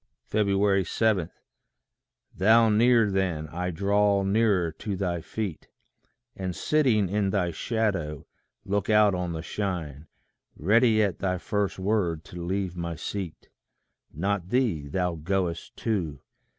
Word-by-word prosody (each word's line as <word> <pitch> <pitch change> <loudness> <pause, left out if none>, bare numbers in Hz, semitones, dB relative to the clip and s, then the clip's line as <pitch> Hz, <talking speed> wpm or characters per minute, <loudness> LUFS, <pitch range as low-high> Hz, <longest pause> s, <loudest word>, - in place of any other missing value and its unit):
7. 100 -1 +2 1.1
Thou 110 +4 +5
near 115 0 +4
then, 90 -5 -1
I 90 +3 -3
draw 100 +2 +2
nearer 100 -4 +2
to 100 +5 -5
thy 90 -3 -2
feet, 100 -2 -5 0.7
And 95 -2 -4
sitting 125 -10 +2
in 100 +1 0
thy 95 -3 0
shadow, 95 - -2 0.4
look 100 0 -1
out 105 -2 +5
on 90 -1 -2
the 80 -1 -5
shine; 85 -7 -4 0.5
Ready 110 +5 +4
at 100 -4 -1
thy 90 -1 0
first 100 +2 -2
word 95 -5 0
to 90 -1 -8
leave 95 0 -2
my 85 -1 -4
seat 95 -1 -6 0.6
Not 95 +3 -2
thee: 105 - 0
thou 90 +4 -1
goest 85 +1 -3
too. 85 -11 -2
95 Hz, 125 wpm, -27 LUFS, 85-105 Hz, 1.1 s, Thou